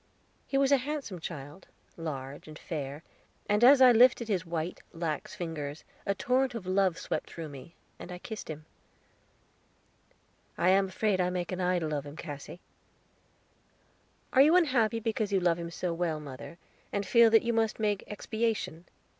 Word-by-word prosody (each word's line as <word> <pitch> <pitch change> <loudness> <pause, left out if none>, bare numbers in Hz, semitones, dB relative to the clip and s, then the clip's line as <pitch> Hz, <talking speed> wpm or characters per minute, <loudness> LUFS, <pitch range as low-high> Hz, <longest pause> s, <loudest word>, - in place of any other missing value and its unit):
He 275 - 0
was 275 0 +3
a 280 - +7
handsome 270 - -4
child, 150 +1 -8 0.3
large 145 -4 -6
and 155 -1 -10
fair, 145 -2 -5 0.4
and 210 +2 +2
as 265 +1 +8
I 250 - +9
lifted 235 0 +5
his 185 -4 -1
white, 165 +1 -3
lax 165 +2 -3
fingers, 160 -5 -5 0.2
a 200 - +1
torrent 255 +4 +1
of 215 -5 -5
love 185 -2 +2
swept - - -3
through 165 -2 -7
me, 140 +4 -11 0.2
and 180 - -9
I 180 - -5
kissed 215 +2 -8
him. 155 0 -7 1.9
"I 175 - +3
am 195 +1 +4
afraid 190 0 0
I 180 - +1
make 180 0 -3
an 185 0 -3
idol 175 -4 0
of 145 -1 -3
him, 145 - -9
Cassy." 150 +2 -8 1.7
"Are 265 - +7
you 310 +5 +6
unhappy 245 -10 +3
because 220 -2 -1
you 195 - +3
love 175 -2 +2
him 170 0 -5
so 175 0 -3
well, 165 -2 -1
mother, 145 +3 -9 0.3
and 200 0 -1
feel 235 +1 +6
that 225 0 +5
you 235 0 0
must 225 -1 0
make 210 -2 0
expiation?" 215 -5 -2
185 Hz, 170 wpm, -30 LUFS, 160-225 Hz, 1.9 s, I